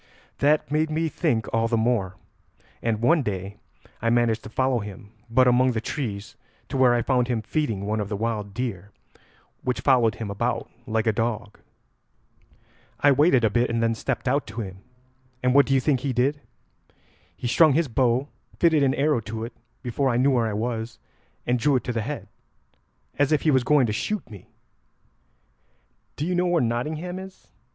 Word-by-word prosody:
"That 150 Hz, +1 st, +2 dB
made 155 Hz, +1 st, +1 dB
me 160 Hz, +1 st, 0 dB
think 135 Hz, -10 st, 0 dB
all 115 Hz, 0 st, +2 dB
the 115 Hz, 0 st, +1 dB
more, 110 Hz, -5 st, 0 dB, 0.7 s
and 115 Hz, -1 st, -1 dB
one 160 Hz, +6 st, +4 dB
day 100 Hz, -3 st, -4 dB, 0.4 s
I 115 Hz, -, +1 dB
managed 115 Hz, -2 st, +2 dB
to -, -, -7 dB
follow 130 Hz, +2 st, +1 dB
him 105 Hz, -1 st, -9 dB, 0.2 s
but 130 Hz, +2 st, +4 dB
among 125 Hz, +1 st, +4 dB
the 110 Hz, -, -1 dB
trees 110 Hz, -4 st, -5 dB, 0.3 s
to 135 Hz, -, -2 dB
where 125 Hz, -2 st, +5 dB
I 120 Hz, -, +1 dB
found 125 Hz, -3 st, +1 dB
him 120 Hz, -3 st, -1 dB
feeding 110 Hz, -7 st, -2 dB
one 110 Hz, +1 st, -1 dB
of 105 Hz, -1 st, -3 dB
the 105 Hz, -, -2 dB
wild 105 Hz, -2 st, -2 dB
deer, 100 Hz, -4 st, -4 dB, 0.7 s
which 125 Hz, -, -2 dB
followed 120 Hz, -5 st, +3 dB
him 110 Hz, -3 st, -5 dB
about 100 Hz, -, -2 dB, 0.2 s
like 110 Hz, 0 st, 0 dB
a 110 Hz, -, +3 dB
dog." 110 Hz, -2 st, -3 dB, 1.4 s
"I 145 Hz, -, +5 dB
waited 140 Hz, -2 st, +4 dB
a 110 Hz, -, +3 dB
bit, 120 Hz, +2 st, +1 dB
and 115 Hz, 0 st, 0 dB
then 115 Hz, 0 st, +2 dB
stepped 115 Hz, -, -3 dB
out 140 Hz, +3 st, +1 dB
to 110 Hz, +2 st, -5 dB
him, 95 Hz, -2 st, -8 dB, 0.6 s
and 125 Hz, 0 st, +3 dB
what 140 Hz, +1 st, +6 dB
do 135 Hz, -, +2 dB
you -, -, +4 dB
think 135 Hz, 0 st, +1 dB
he 135 Hz, 0 st, -2 dB
did? 135 Hz, +4 st, +1 dB, 1.0 s
He -, -, -8 dB
strung 155 Hz, +4 st, +5 dB
his 160 Hz, +2 st, +2 dB
bow, 125 Hz, +2 st, +1 dB, 0.3 s
fitted 160 Hz, -3 st, +4 dB
an 135 Hz, -1 st, +2 dB
arrow 145 Hz, -2 st, +2 dB
to 110 Hz, 0 st, -6 dB
it 115 Hz, -, -9 dB, 0.3 s
before 130 Hz, +2 st, 0 dB
I 120 Hz, -, +1 dB
knew 135 Hz, +3 st, +3 dB
where 120 Hz, -3 st, +2 dB
I 110 Hz, -, -2 dB
was, 115 Hz, +1 st, -3 dB, 0.5 s
and 125 Hz, 0 st, +1 dB
drew 145 Hz, +3 st, +2 dB
it 125 Hz, -, 0 dB
to 125 Hz, -, -3 dB
the 115 Hz, -, -1 dB
head 140 Hz, +6 st, -5 dB, 0.9 s
as 145 Hz, +1 st, +3 dB
if 155 Hz, -, +2 dB
he 155 Hz, -, +4 dB
was 130 Hz, -2 st, +3 dB
going 145 Hz, 0 st, +4 dB
to 105 Hz, -, -1 dB
shoot 205 Hz, -, -3 dB
me. 105 Hz, -5 st, -12 dB, 1.7 s
'Do 150 Hz, -, -3 dB
you 180 Hz, -, -1 dB
know 180 Hz, 0 st, +1 dB
where 175 Hz, -1 st, +2 dB
Nottingham 150 Hz, +10 st, -2 dB
is?' 190 Hz, 0 st, -12 dB
120 Hz, 190 wpm, -24 LUFS, 110-140 Hz, 1.7 s, what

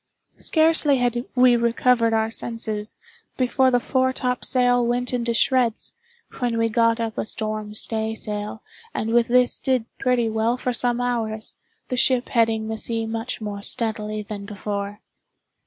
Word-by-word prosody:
Scarcely 315 Hz, -3 st, +3 dB
had 245 Hz, 0 st, 0 dB
we 250 Hz, -1 st, +6 dB
recovered 235 Hz, 0 st, +2 dB
our 220 Hz, 0 st, +1 dB
senses, 220 Hz, -2 st, -4 dB, 0.4 s
before 260 Hz, +1 st, +3 dB
the 245 Hz, -1 st, +3 dB
foretopsail 250 Hz, -1 st, +1 dB
went 245 Hz, +1 st, -1 dB
into 235 Hz, -1 st, 0 dB
shreds, 240 Hz, -1 st, +1 dB, 0.5 s
when 240 Hz, -3 st, 0 dB
we 230 Hz, 0 st, +2 dB
got 230 Hz, 0 st, +2 dB
up 225 Hz, -1 st, -3 dB
a -, -, 0 dB
storm 215 Hz, -1 st, -4 dB
stay 220 Hz, 0 st, -1 dB
sail 210 Hz, 0 st, -5 dB, 0.3 s
and 225 Hz, +1 st, -1 dB
with 235 Hz, -1 st, +4 dB
this 250 Hz, 0 st, +3 dB
did 255 Hz, -4 st, 0 dB
pretty 250 Hz, -3 st, +2 dB
well 225 Hz, +2 st, 0 dB
for 250 Hz, 0 st, -2 dB
some 245 Hz, 0 st, 0 dB
hours, 225 Hz, -3 st, -2 dB, 0.4 s
the 255 Hz, -, -2 dB
ship 250 Hz, 0 st, +2 dB
heading 225 Hz, -2 st, +1 dB
the 220 Hz, 0 st, -3 dB
sea 225 Hz, 0 st, -2 dB
much 225 Hz, +2 st, -4 dB
more 205 Hz, -1 st, -5 dB
steadily 215 Hz, -1 st, 0 dB
than 205 Hz, -1 st, -7 dB
before. 205 Hz, 0 st, -5 dB
230 Hz, 150 wpm, -23 LUFS, 220-245 Hz, 0.5 s, we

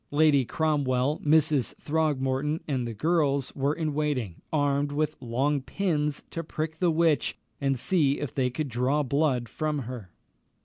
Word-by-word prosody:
Lady 145 Hz, -3 st, +4 dB
Cromwell, 145 Hz, -2 st, 0 dB
Mrs. 150 Hz, -3 st, +3 dB
Throgmorton, 150 Hz, -1 st, 0 dB
and 130 Hz, -5 st, -1 dB
the 115 Hz, -, -4 dB
girls 145 Hz, -1 st, +1 dB
were 140 Hz, +2 st, 0 dB
in 155 Hz, -3 st, -2 dB
waiting, 140 Hz, -, -2 dB
armed 145 Hz, -1 st, +1 dB
with 155 Hz, +1 st, -1 dB
long 135 Hz, +4 st, 0 dB
pins 150 Hz, -3 st, -1 dB
to 165 Hz, -, -4 dB
prick 155 Hz, +1 st, -4 dB
the 180 Hz, -, +3 dB
witch, 160 Hz, -2 st, +2 dB, 0.2 s
and 135 Hz, -1 st, +1 dB
see 140 Hz, +2 st, +2 dB
if 145 Hz, -, -4 dB
they 130 Hz, -2 st, +1 dB
could 145 Hz, +4 st, -3 dB
draw 130 Hz, +5 st, +1 dB
blood 140 Hz, -3 st, +1 dB
from 150 Hz, +2 st, -2 dB
her. 115 Hz, -6 st, -7 dB
145 Hz, 150 wpm, -27 LUFS, 130-155 Hz, 0.2 s, Lady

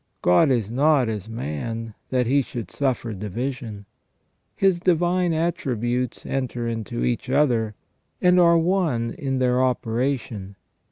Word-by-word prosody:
God 90 Hz, -, +5 dB
is 115 Hz, -5 st, +1 dB
not 140 Hz, -1 st, +3 dB
as 105 Hz, -1 st, -4 dB
man, 115 Hz, +3 st, -4 dB, 0.2 s
that 125 Hz, -1 st, +1 dB
He 140 Hz, +4 st, +3 dB
should 120 Hz, -3 st, -6 dB
suffer 130 Hz, -5 st, -1 dB
division. 110 Hz, +1 st, -5 dB, 0.7 s
His 190 Hz, -3 st, +2 dB
divine 175 Hz, 0 st, +2 dB
attributes 125 Hz, -, -1 dB
enter 125 Hz, -3 st, -2 dB
into 115 Hz, +1 st, -3 dB
each 125 Hz, +2 st, -2 dB
other, 120 Hz, -6 st, +2 dB, 0.4 s
and 180 Hz, 0 st, +4 dB
are 170 Hz, -1 st, +6 dB
on.e 165 Hz, -10 st, +1 dB
in 135 Hz, -1 st, 0 dB
their 125 Hz, 0 st, +2 dB
operation. 120 Hz, -4 st, -2 dB
125 Hz, 125 wpm, -23 LUFS, 115-150 Hz, 0.7 s, are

